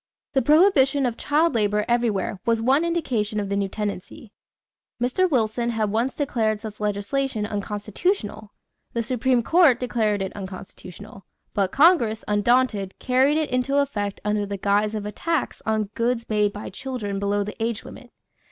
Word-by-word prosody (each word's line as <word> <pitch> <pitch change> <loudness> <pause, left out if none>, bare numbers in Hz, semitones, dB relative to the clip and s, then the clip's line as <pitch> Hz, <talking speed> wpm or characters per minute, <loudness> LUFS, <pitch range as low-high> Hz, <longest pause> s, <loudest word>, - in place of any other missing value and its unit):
The 270 - +3
prohibition 290 -2 +4
of 240 -2 -1
child 305 +6 +1
labor 210 -2 +1
everywhere 225 -5 0
was 230 -1 +1
one 265 +7 +3
indication 245 -11 -1
of 200 -1 -3
the 200 - -1
new 200 -1 0
tendency. 205 +1 -6 0.7
Mr. 255 +10 +1
Wilson 235 -3 0
had 220 -3 -1
once 235 +5 0
declared 225 -7 0
such 215 -1 -8
legislation 210 +3 -1
unconstitutional; 210 - -3 0.4
the 235 - -1
Supreme 250 +1 +1
Court 320 -7 +5
declared 220 -5 0
it 190 - -6
unconstitutional; 195 0 -10 0.3
but 195 -3 0
Congress, 275 -9 +4
undaunted, 210 -2 +1
carried 265 +4 +2
it 310 -3 -1
into 255 +2 +1
effect 210 -8 -1
under 210 0 +1
the 200 0 -4
guise 205 +2 +1
of 210 -1 -4
a 210 - -4
tax 330 +5 -2
on 215 -2 0
goods 235 0 -1
made 210 -1 +1
by 205 +1 -7
children 205 -3 -4
below 200 0 0
the 210 +2 -8
age 230 -1 -2
limit. 250 - -11
220 Hz, 160 wpm, -24 LUFS, 205-260 Hz, 0.7 s, Court